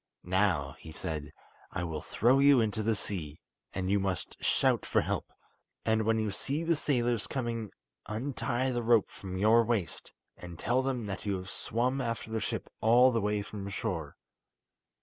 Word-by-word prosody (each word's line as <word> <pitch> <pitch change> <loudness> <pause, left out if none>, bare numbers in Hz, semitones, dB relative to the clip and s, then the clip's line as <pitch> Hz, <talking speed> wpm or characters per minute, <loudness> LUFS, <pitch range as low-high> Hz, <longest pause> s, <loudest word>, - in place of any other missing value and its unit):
"Now," 90 -7 +1
he 80 - -10
said, 80 -2 -5 0.4
"I 95 - -3
will 80 -3 -3
throw 125 +5 +3
you 140 -1 +7
into 110 -1 0
the 110 +1 +1
sea, 85 -7 -5 0.3
and 95 0 -2
you 100 - +4
must 95 -2 -2
shout - - +3
for - - +2
help; - - -3 0.5
and 110 -1 +2
when 115 0 +3
you 110 -2 0
see 145 +10 -2
the 165 0 +2
sailors 120 -6 0
coming 115 -4 -3 0.4
untie 125 +2 -1
the 120 -1 -1
rope 115 -2 +3
from 95 -1 -6
your 110 +4 +5
waist, 110 -6 -2 0.2
and 85 -2 -9
tell 120 +8 +1
them 130 -4 -2
that 100 +1 -5
you 100 - +1
have 95 +1 -8
swum 125 +4 -1
after 115 -2 -3
the 110 0 -1
ship - - -3
all 120 +3 +6
the 115 -2 +1
way 105 0 0
from 100 -1 -6
shore." 80 -6 -3
110 Hz, 175 wpm, -31 LUFS, 95-120 Hz, 0.5 s, you